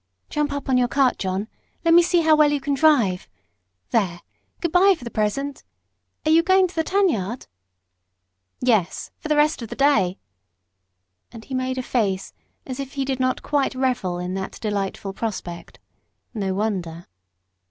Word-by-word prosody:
"Jump 295 -1 0
up 285 -1 -4
on 255 -2 +3
your 245 - +3
cart, 265 0 +2
John. 190 +2 -2 0.4
Let 330 - +5
me 345 - +8
see 350 0 +2
how 315 -1 +5
well 300 -1 +4
you 290 - +1
can 280 +1 -2
drive. 265 -11 +3 0.6
There 180 -6 0 0.4
good 340 - -2
bye, 380 +3 +5
for - - -13
the 235 - -6
present. 270 +8 -2 0.6
Are 310 - +3
you 325 +1 +6
going 375 +2 +4
to 355 - -14
the 325 - 0
tan 395 +3 +2
yard?" 225 - -2 1.2
"Yes 220 -8 +1
for - - -6
the 305 - +2
rest 295 -1 +2
of 230 - -6
the - - -6
day." 210 -10 +3 1.1
And 225 -2 -11
he 270 - -8
made 255 0 -1
a 255 - -2
face 200 -7 -1 0.3
as 260 0 -6
if 275 -1 -6
he 275 -2 -2
did 265 -1 -2
not 255 0 0
quite 285 -3 0
revel 250 -9 -1
in 180 +1 -4
that 190 0 -5
delightful 200 -2 -3
prospect. 190 -5 -5 0.6
No 195 -4 -2
wonder! 180 -5 -3
255 Hz, 175 wpm, -23 LUFS, 200-295 Hz, 1.2 s, me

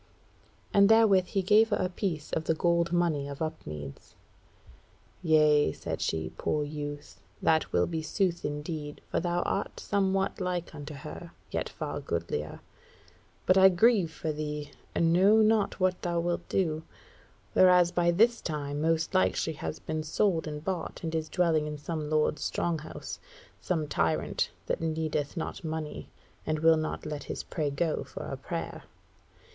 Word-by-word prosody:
And 200 0 +6
therewith 215 -5 +6
he 195 +1 -1
gave 215 +4 +5
her 205 - +2
a 185 - +1
piece 180 -4 -3
of 160 - -1
the 160 - +2
gold 170 +1 +2
money 170 -5 +1
of 140 -1 -7
Upmeads. 75 - -6 1.1
"Yea," 150 - +4
said - - -5
she, 80 -1 -1
"poor 150 - 0
youth; 145 0 -7 0.2
that 160 -1 +2
will - - +3
be 165 -2 -3
sooth 175 +1 -1
indeed, 150 0 -4
for - - +1
thou 175 +1 0
art 195 - -2
somewhat 195 -1 0
like 180 -2 -2
unto 150 0 -7
her, 155 +4 -9 0.2
yet - - -2
far - - -4
goodlier. 80 -3 -3 0.8
But 185 +1 +5
I 190 0 +9
grieve 190 -2 +3
for 160 0 -3
thee, 150 -1 -4 0.2
and 165 0 +3
know 195 +5 +6
not 215 -2 +2
what 185 -1 +1
thou 170 -1 0
wilt 175 0 -2
do; 160 -5 0 0.7
whereas 180 -2 +6
by 175 -1 +2
this 230 +7 +3
time 145 -2 -3
most 160 0 +1
like 95 0 +3
she 160 - -1
has 155 +1 -5
been 155 0 -3
sold 160 +1 +1
and 150 0 -6
bought 185 -1 -3
and 165 -1 -3
is 160 -1 -2
dwelling 165 -4 +2
in 150 0 -4
some 150 0 -4
lord's 155 -1 +1
strong 170 -2 -1
house; 155 - -8 0.4
some 160 -4 -1
tyrant 80 - 0 0.2
that - - -2
needeth 155 -1 -2
not 165 - -4
money, 160 -1 -5 0.3
and 155 - -1
will 160 +1 +5
not 155 0 -3
let 150 -2 -5
his - - -5
prey 150 -3 -2
go 155 +3 -1
for - - -8
a - - -4
prayer. - - -5
160 Hz, 165 wpm, -29 LUFS, 150-180 Hz, 1.1 s, I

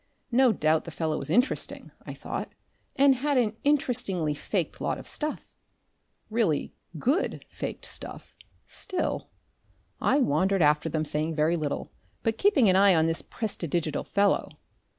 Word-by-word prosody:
No 255 0 +5
doubt 155 -5 +1
the - - -6
fellow 160 -1 -2
was 140 - -5
interesting, 245 - 0 0.2
I - - -6
thought, - - -5 0.4
and 275 0 +6
had 280 +2 0
an 220 -3 +2
interestingly 240 - +1
faked 145 - -3
lot - - -1
of - - -10
stuff, 305 0 -4 0.8
really 215 -10 +1 0.2
GOOD 275 - 0
faked - - -6
stuff, - - -7 0.3
still 370 - -3 0.7
I - - +3
wandered 190 - +2
after 150 +2 +3
them, 155 0 -1
saying 155 +2 -1
very 155 +3 +2
little, 150 -4 -3 0.3
but 225 0 0
keeping 380 - +4
an 185 - +5
eye 195 -1 +6
on 160 -1 +3
this 165 0 0
prestidigital 170 -7 -3
fellow. 200 0 +2
190 Hz, 145 wpm, -27 LUFS, 155-250 Hz, 0.8 s, and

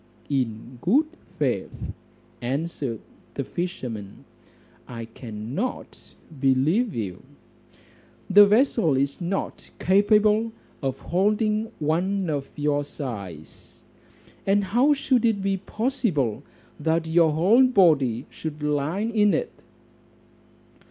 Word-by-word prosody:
"In 120 -2 -2
good 265 - +3 0.3
faith," - - -2 0.5
answered 135 -2 -3 0.3
the - - -2
fisherman, 125 - -5 0.6
"I 115 -2 -6
cannot 115 - -6 0.2
believe 150 - +2
you; 100 -6 -4 1.1
the 205 +1 +8
vessel 210 - +3
is 140 +5 -1
not 185 +3 -3
capable 210 +3 +3 0.3
of 135 -2 -2
holding 215 +4 0
one 175 +4 0
of 140 -2 -3
your 145 0 0
size, 100 - -9 0.6
and 200 +1 +3
how 245 +10 +3
should 260 -3 +1
it 225 -3 +2
be 195 0 +1
possible 195 - -1 0.4
that 165 0 +1
your 160 0 +4
whole 210 +12 +5
body 145 - +3
should 155 -1 -6
lie 150 +5 0
in 215 -2 +2
it?" 485 - -2
165 Hz, 100 wpm, -25 LUFS, 135-210 Hz, 1.1 s, the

